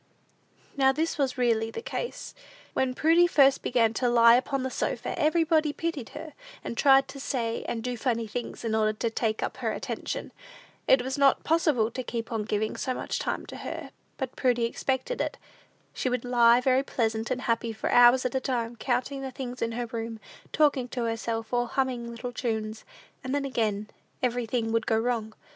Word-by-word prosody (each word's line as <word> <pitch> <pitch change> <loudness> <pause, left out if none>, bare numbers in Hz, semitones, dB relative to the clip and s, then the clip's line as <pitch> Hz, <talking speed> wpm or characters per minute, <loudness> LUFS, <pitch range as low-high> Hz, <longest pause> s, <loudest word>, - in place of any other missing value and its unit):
Now 265 -1 +4
this 310 +2 -2
was 270 -2 0
really 230 -3 +2
the 455 - -7
case. 485 - -5 0.4
When 255 -1 0
Prudy 330 +4 +5
first 275 -5 +4
began 230 -2 +2
to 245 +2 +1
lie 235 -1 +7
upon 265 +1 0
the 260 - -3
sofa, - - -2
everybody 315 -1 +2
pitied 325 -8 -3
her, 315 - -8 0.3
and - - -5
tried 270 +2 +5
to 275 - -8
say 235 -4 -2
and 225 -1 -3
do 250 0 -2
funny 230 -1 -1
things, 235 +2 -6
in 220 - -1
order 215 -1 +2
to 225 +2 -2
take 220 -1 -1
up - - -3
her - - -1
attention. - - -4 0.6
It 260 -2 +5
was 265 +2 -3
not 275 -1 +4
possible 305 -9 +2
to 255 - -4
keep 230 -2 -5
on 220 -2 -2
giving 215 0 -1
so 255 - -2
much - - -3
time - - -2
to - - -9
her; - - -6 0.3
but 265 -2 -4
Prudy 245 -3 +2
expected 265 - -2
it. - - -3 0.6
She 255 - -1
would 250 -1 -2
lie 240 0 +5
very 260 +1 +3
pleasant 225 -4 -1
and 255 - -1
happy 230 -1 0
for 220 - -3
hours 245 +1 +6
at 250 - -1
a 265 - +1
time, 240 -3 -2
counting 255 +3 -1
the 270 - -4
things 250 -1 -7
in 230 - +1
the 240 +1 -3
room, 225 -1 -5 0.3
talking 285 -4 +2
to 245 -1 -3
herself, 225 0 -3
or 245 0 +1
humming 250 -2 -1
little 235 +1 -6
tunes; 220 -2 -3 0.4
and 260 +1 -2
then, 285 -1 -1
again, 215 -5 -1 0.4
everything 240 -2 0
would 225 -1 0
go 220 - +3
wrong. 225 -2 -1
245 Hz, 195 wpm, -27 LUFS, 230-265 Hz, 0.6 s, lie